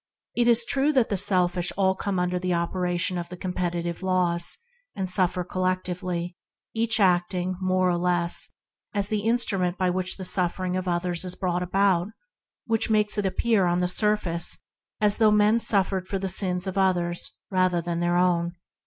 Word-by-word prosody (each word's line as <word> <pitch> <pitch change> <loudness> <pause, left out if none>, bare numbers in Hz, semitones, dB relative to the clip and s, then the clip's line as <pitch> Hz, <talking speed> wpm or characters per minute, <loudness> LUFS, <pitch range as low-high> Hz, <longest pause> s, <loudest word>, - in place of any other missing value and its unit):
It 240 0 +2
is 235 0 +4
true 275 +4 +2
that 255 -4 +3
all - - -23
the 200 - -1
selfish 180 -2 +1 0.3
come 200 -2 -2
under 180 0 0
the 180 -1 -1
operation 175 +1 -1
of 170 0 -6
the 180 - -8
competitive 175 -1 -3
laws 180 -2 0 0.4
and 190 -1 -3
suffer 180 -1 0
collectively, 180 -1 -3 0.4
each 225 0 +1
acting 180 -1 +1
more 185 0 +1
or 175 - 0
less 175 -1 0 0.4
as 200 0 0
the 215 - 0
instrument 200 -5 0
by 185 -1 +1
which 185 0 -1
the 190 - -5
suffering 180 0 -1
of 185 0 -3
others 175 0 0
is 180 -1 0
brought 180 -1 -2
about, 180 -1 +2
and 215 - -12 0.5
that 225 -1 +1
this - - +1
makes 210 -1 +2
it 200 - 0
appear 200 -1 +1
on 175 0 +1
the 180 - +1
surface 180 -3 +2 0.4
as 210 -1 +3
though 220 -2 +5
men 210 +2 +3
suffered 195 -4 +1
for 195 - -2
the 195 0 -3
sins 180 -1 +2
of 190 0 -2
others 175 -2 0
rather 185 -2 +2
than 170 0 -3
their 175 0 +1
own. 175 -1 +1
185 Hz, 180 wpm, -25 LUFS, 175-200 Hz, 0.5 s, though